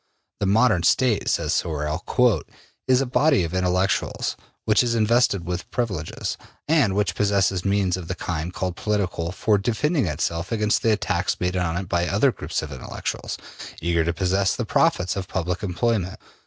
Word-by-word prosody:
The 100 - 0
modern 110 -2 +4
State, 115 +4 +2
says - - 0
Sorel, 75 +1 -2
``is 125 - 0
a - - +1
body 135 - +3
of 85 +1 -4
intellectuals, 95 +1 0 0.3
which 110 -1 +4
is 120 -1 0
invested 110 -4 +2
with 90 0 -4
privileges, 100 -10 -3 0.3
and 145 -11 +3
which 105 0 +1
possesses 100 -3 +1
means 100 -2 +1
of 90 -3 -7
the 95 - -3
kind 85 -1 -3
called 90 -1 -3
political 95 -5 -1
for 105 +2 +1
defending 135 - 0
itself 85 +3 -2
against 105 -2 +1
the 115 - +3
attacks 105 - 0
made 90 +1 -1
on 90 -2 0
it 95 0 -4
by 85 -1 0
other 105 +9 +3
groups 80 -7 -4
of 75 - -7
intellectuals, 65 -2 -5 0.4
eager 85 0 +1
to 85 - 0
possess 95 +2 +1
the - - -3
profits 90 +1 +2
of 95 -2 -4
public 90 +1 -2
employment. 95 0 -1
95 Hz, 170 wpm, -23 LUFS, 85-110 Hz, 0.4 s, modern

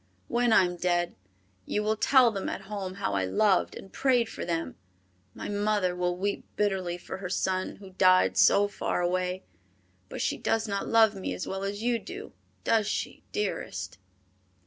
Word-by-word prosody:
When 240 0 +2
I 205 - +7
am 180 -1 -2
dead, 175 -1 0 0.5
you 210 - 0
will 215 +1 +1
tell 250 +2 +5
them 195 -2 -3
at - - -4
home 195 -2 -5
how 105 - -2
I 95 -1 +1
loved 190 - +2
and 195 - -11
prayed 245 -4 +2
for - - -6
them. 165 -1 -2 0.6
My - - -6
mother 205 -3 0
will 180 0 -1
weep 200 +2 -2
bitterly 190 -4 0
for 180 - -7
her 185 -1 -6
son, 185 0 -1
who 195 -2 -13
died 185 0 +4
so 205 0 +5
far 205 - -2
away, 180 +1 -1 0.7
but - - -6
she - - 0
does 225 0 0
not 200 -1 -2
love 225 -2 +5
me 195 -2 -4
as - - -4
well 190 0 -3
as 205 +2 -3
you 240 -1 +1
do, - - -9 0.3
does 220 -3 +2
she, - - -3
dearest?" 95 - -3
195 Hz, 180 wpm, -28 LUFS, 180-210 Hz, 0.7 s, I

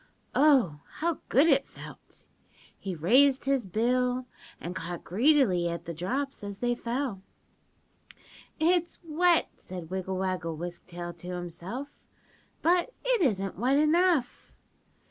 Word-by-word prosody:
"Oh, 260 - +4
how 335 -1 -1
good 275 +5 +5
it 275 -4 +3
felt. - - -13 0.5
He 190 -2 -5
raised 255 - +4
his 270 -6 +1
bill 250 +5 +1 0.3
and 175 +2 -6
caught 170 +1 -5
greedily 210 - +3
at 170 0 -5
the 170 - -5
drops 260 - -3
as 200 -1 -6
they 240 +2 0
fell. 240 -3 -3 1.4
"'It's 345 +1 +2
wet', 340 +1 +2
said 180 -2 -8
Wiggle 190 0 -3
Waggle 180 -4 -2
Wisk 175 +1 -6
Tail 175 -1 -6
to 175 +1 -12
himself, 180 - -6 0.7
'but 355 +8 +2
it - - +2
isn't 195 - 0
wet 260 +4 +3
enough. 305 -3 +2
240 Hz, 125 wpm, -28 LUFS, 180-285 Hz, 1.4 s, good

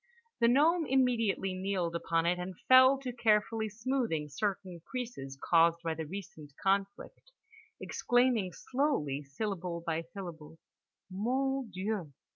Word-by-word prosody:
The 235 - +4
gnome 310 +7 +4
immediately 230 -7 +1
kneeled 185 -3 -2
upon 165 0 0
it 180 +1 +1
and 180 +1 -5
fell 260 +1 +8
to 255 -2 -4
carefully 220 -1 +1
smoothing 220 - -2
certain 185 +2 -3
creases 230 - -5
caused 170 +1 +3
by 165 -1 -1
the 160 -1 -5
recent 160 -5 -9
conflict, 195 - -1 0.5
exclaiming 245 -6 +1
slowly 250 - -1
syllable 170 +3 -4
by 165 -1 -1
syllable: 165 -3 -9 0.5
"Mon 260 +5 -1
Dieu. 185 -4 -3
195 Hz, 120 wpm, -31 LUFS, 170-245 Hz, 0.5 s, fell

